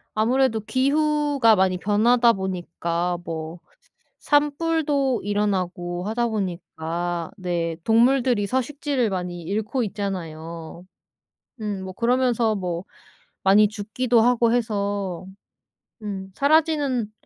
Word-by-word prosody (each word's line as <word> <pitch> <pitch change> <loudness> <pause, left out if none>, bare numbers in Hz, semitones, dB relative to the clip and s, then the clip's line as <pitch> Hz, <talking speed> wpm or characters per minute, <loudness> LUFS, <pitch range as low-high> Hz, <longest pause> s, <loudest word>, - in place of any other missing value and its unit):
아무래도 230 +1 +2
기후가 280 -1 +2
많이 185 -1 +2
변하다 230 +5 +3
보니까 175 -2 -2
뭐 160 +1 -6 0.6
산불도 290 -3 +1
일어나고 185 -4 -1
하다 235 +2 0
보니까 175 -4 -3
네 170 -3 -2
동물들이 240 -1 +3
서식지를 260 -1 -1
많이 180 -2 -4
잃고 215 +7 -2
있잖아요. 170 -4 -6 0.8
음 205 -3 -3
뭐 185 - -6
그러면서 240 -2 +2
뭐 180 -2 -3 0.6
많이 205 +2 +6
죽기도 225 +3 0
하고 235 -1 +3
해서 200 -6 -2 0.8
음 195 -2 -5
"사라지는 285 -6 +2
210 Hz, 230 characters per minute, -23 LUFS, 180-250 Hz, 0.8 s, 많이